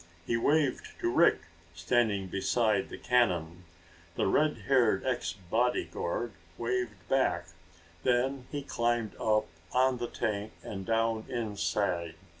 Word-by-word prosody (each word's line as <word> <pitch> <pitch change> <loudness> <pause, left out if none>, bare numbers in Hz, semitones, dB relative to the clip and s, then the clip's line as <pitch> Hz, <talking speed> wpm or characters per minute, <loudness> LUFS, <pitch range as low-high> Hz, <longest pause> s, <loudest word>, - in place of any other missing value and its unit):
He 115 - 0
waved 140 +3 +1
to 115 - +1
Rick, 170 - +5 0.3
standing 100 +3 +1
beside 100 +2 +1
the - - -7
cannon. 90 -8 +1 0.5
The - - +1
redhaired 130 -4 +2
ex 130 -2 -1
bodyguard 110 +1 -1 0.3
waved 115 -6 -2
back. 130 -9 +1 0.5
Then 130 +1 +1
he 145 -1 -3
climbed 120 -4 0
up 110 -1 +2 0.3
on 130 0 +3
the 120 - -2
tank 105 -3 -3
and 95 -2 -6
down 115 -1 +1
inside. 100 -7 -1
115 Hz, 115 wpm, -30 LUFS, 100-125 Hz, 0.5 s, Rick